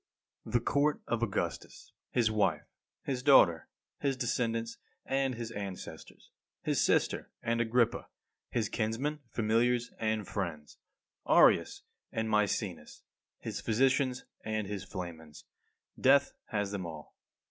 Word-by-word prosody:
31. - - -9
The - - -16
court 145 +1 +2
of 120 -1 -1
Augustus, 110 -4 -3 0.2
his 115 -3 +2
wife, 95 -8 +1 0.4
his 130 -2 -2
daughter, 95 - +6 0.3
his 135 -2 0
descendants 115 -1 -1 0.3
and 135 -1 0
his 115 0 -5
ancestors; 100 -4 -8 0.3
his - - +1
sister, - - +1
and 115 0 +1
Agrippa; 120 0 +1 0.4
his 115 -3 0
kinsmen, 120 +9 -1
familiars 115 +2 +1
and 110 -2 -1
friends; 80 -7 -5 0.5
Areius - - +5 0.3
and 110 0 -2
Maecenas; 105 -5 -1 0.3
his - - -5
physicians 130 +2 +2 0.2
and 110 -1 -2
his 100 -1 -4
flamens 85 -5 -8 0.5
death 140 +1 +5
has 105 -2 -2
them 95 -4 -3
all. 80 -2 -10
110 Hz, 120 wpm, -31 LUFS, 100-125 Hz, 0.5 s, daughter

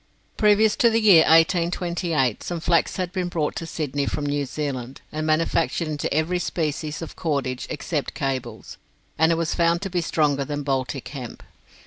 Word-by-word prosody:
Previous 210 0 +4
to 235 - +5
the 225 0 +2
year 200 -7 +7
1828 170 - +2
some 175 -1 -4
flax 165 0 +1
had 180 -2 -2
been 180 -1 -1
brought 160 -4 -2
to 165 - -5
Sydney 145 -4 -2
from 145 - -2
New 145 -1 -1
Zealand, 135 -3 -4
and 155 +1 -3
manufactured 165 +1 +1
into 150 -1 -3
every 160 +4 +1
species 155 -2 -3
of 165 - -9
cordage 140 -6 -2
except 150 -1 -3
cables, 130 -5 -4 0.4
and 160 +1 +5
it - - +3
was 165 -1 -1
found 170 +1 +2
to 195 - -4
be 175 -1 0
stronger 150 -4 +1
than 145 +1 -4
Baltic 135 -1 -2
hemp. 130 -5 -8
155 Hz, 170 wpm, -23 LUFS, 140-170 Hz, 0.4 s, year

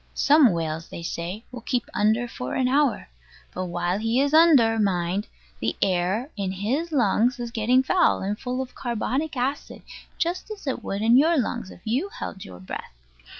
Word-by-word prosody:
Some 290 -5 +5
whales, 165 -1 -3
they 170 - -8
say, 175 +6 -5
will 250 -2 -8
keep 245 +1 -2
under 220 +3 +2
for 125 - -5
an 255 - +2
hour. 275 -2 +1 0.5
But 185 - -3
while 175 +2 -1
he 225 +3 +1
is 285 +1 +1
under, 280 -9 +6
mind, 190 0 0 0.3
the - - -1
air 195 - 0
in 195 -2 -2
his 250 - -2
lungs 245 -1 +2
is 240 -1 -4
getting 245 +3 +2
foul, 355 - +2
and 205 +2 -2
full 255 +1 -2
of 255 - -13
carbonic 260 +5 -2
acid, 270 +4 -3 0.3
just 350 +5 -2
as 425 -5 -8
it 270 - -3
would 200 +2 -3
in 230 +2 +6
your 320 +4 +4
lungs, 240 -5 -2
if - - -13
you 260 - 0
held 190 - -7
your 90 -1 -11
breath. 95 -7 -7
235 Hz, 185 wpm, -24 LUFS, 190-270 Hz, 0.5 s, under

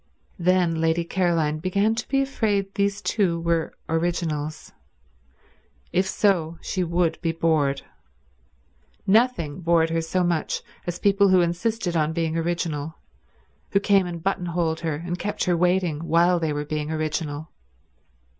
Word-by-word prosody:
Then 175 -2 +2
Lady 165 +1 +2
Caroline 165 -4 0
began 200 +5 +1
to 225 0 -4
be 275 0 +2
afraid 205 -7 -1
these 200 0 0
two 180 -6 +1
were 165 -1 -1
originals. 160 -2 -2 1.2
If 190 +1 +2
so, 175 -5 +1
she 185 - -2
would 170 -1 0
be 165 -2 0
bored. 155 -4 +1 1.2
Nothing 195 - +2
bored 165 -1 +3
her 165 0 +1
so 180 +3 0
much 170 -3 -1 0.2
as 175 0 -2
people 200 +1 +3
who 185 -1 +5
insisted 175 +2 -1
on 155 0 +1
being 165 -1 -1
original, 165 -2 -2 0.8
who 200 - +5
came 200 -2 +3
and 170 -2 -6
buttonholed 170 -4 -1
her 160 -3 -2
and 175 +3 -5
kept 205 - -2
her 180 -2 +2
waiting 180 -2 +1
while 175 +1 +4
they 160 -2 -1
were 145 0 -2
being 150 0 -3
original. 155 -1 -3
170 Hz, 140 wpm, -24 LUFS, 160-185 Hz, 1.2 s, who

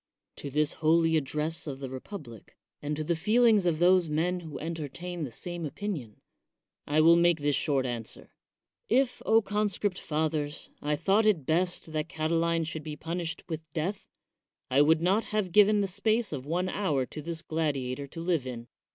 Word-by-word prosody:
To 140 - -6
this 150 +2 +1
holy 165 +1 +4
address 155 +2 -1
of 135 -2 -5
the 135 - -5
republic, 130 - -9 0.2
and 150 +1 -2
to 155 - -3
the 170 +2 0
feelings 215 +2 +4
of 165 -3 +2
those 175 0 +4
men 170 +4 0
who 160 -4 -8
entertain 165 +2 -5
the 130 - -8
same 175 +6 -5
opinion, 150 - -5 0.7
I 150 +2 +3
will 165 +2 +7
make 170 -1 +4
this 145 -1 +1
short 140 -4 +1
answer: 120 -3 -5 0.6
If, 260 -1 +2 0.2
conscript 205 -2 -1
fathers, 150 -1 -2
I 150 +1 0
thought 200 +8 +2
it 175 -10 +2
best 170 0 0
that 155 +1 -2
Catiline 165 +1 0
should 160 0 -4
be 155 0 -6
punished 165 +1 -4
with 160 -2 -4
death, 185 +6 -3 0.6
I 135 +2 +5
would 160 +2 +4
not 195 +5 +2
have 210 -4 -1
given 210 +2 +5
the 200 - 0
space 220 +2 0
of 135 -1 -5
one 180 +4 0
hour 160 -9 0
to 150 - -8
this 165 +1 -5
gladiator 140 -4 -2
to 165 - -8
live 165 -6 0
in. 120 -2 -7
160 Hz, 175 wpm, -29 LUFS, 150-180 Hz, 0.7 s, will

